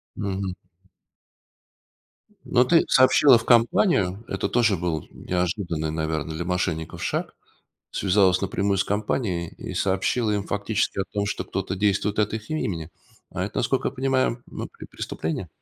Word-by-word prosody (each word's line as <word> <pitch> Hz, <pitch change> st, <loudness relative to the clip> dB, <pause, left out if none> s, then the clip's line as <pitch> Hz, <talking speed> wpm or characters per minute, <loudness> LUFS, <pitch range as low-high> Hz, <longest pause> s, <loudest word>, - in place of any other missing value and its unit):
Мгм. 95 Hz, -2 st, -3 dB, 1.9 s
Но 125 Hz, -, +3 dB
ты 165 Hz, +5 st, +5 dB
сообщила 130 Hz, 0 st, +6 dB
в 115 Hz, -, -6 dB
компанию, 115 Hz, -, +3 dB
это -, -, -2 dB
тоже 115 Hz, -4 st, +3 dB
был 85 Hz, -3 st, -2 dB
неожиданный, 90 Hz, -3 st, -2 dB
наверно, 80 Hz, 0 st, -2 dB
для 80 Hz, +2 st, -4 dB
мошенников 90 Hz, -3 st, -2 dB
шаг, -, -, -2 dB, 0.6 s
связалась 95 Hz, -1 st, +3 dB
напрямую 100 Hz, +1 st, 0 dB
с 100 Hz, -, +2 dB
компанией 100 Hz, -4 st, -1 dB
и -, -, -6 dB
сообщила 100 Hz, +4 st, +1 dB
им 100 Hz, -1 st, 0 dB
фактически 100 Hz, +1 st, -1 dB
о 95 Hz, -, +1 dB
том, 100 Hz, 0 st, -1 dB
что 105 Hz, -, -3 dB
кто-то 95 Hz, -, -3 dB
действует 100 Hz, +1 st, +1 dB
от 105 Hz, -1 st, +2 dB
их 110 Hz, -1 st, -6 dB
имени, 85 Hz, -, -2 dB, 0.4 s
а -, -, -2 dB
это, -, -, -4 dB
насколько -, -, +1 dB
я -, -, -9 dB
понимаю, 130 Hz, -2 st, 0 dB
ну -, -, -6 dB
пре -, -, -12 dB
преступление? 80 Hz, +3 st, -4 dB
100 Hz, 145 wpm, -24 LUFS, 90-110 Hz, 1.9 s, сообщила